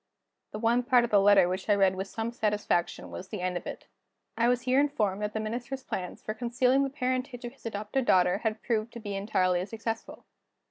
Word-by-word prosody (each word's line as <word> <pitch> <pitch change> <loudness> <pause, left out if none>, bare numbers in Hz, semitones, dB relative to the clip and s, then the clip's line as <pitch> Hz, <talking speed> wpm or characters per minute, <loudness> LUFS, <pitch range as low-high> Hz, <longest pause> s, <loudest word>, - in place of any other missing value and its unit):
The - - -5
one 235 +2 +2
part 250 -1 +4
of 235 - -2
the 205 -2 +6
letter 200 -2 +6
which 185 +3 -3
I 205 - +6
read 195 -2 +4
with 190 +1 -4
some 225 +3 -3
satisfaction 210 -6 -1
was 185 - -7
the 205 -2 -5
end 180 0 -1
of 175 - -4
it. - - -7 0.5
I 235 - +2
was 245 0 +2
here 255 +1 +3
informed 210 -9 +1
that 210 0 -2
the 220 - -2
Minister's 245 +5 -4
plans 180 -1 -5
for 215 - -3
concealing 250 +3 +2
the 275 - -1
parentage 255 -2 -2
of 240 - -6
his 270 - -9
adopted 215 +4 -2
daughter 180 -1 +4
had 220 -1 -2
proved 230 -1 -1
to 235 - -7
be 205 -3 -5
entirely 185 -3 +1
successful. 225 +1 -5
220 Hz, 220 wpm, -29 LUFS, 200-245 Hz, 0.5 s, the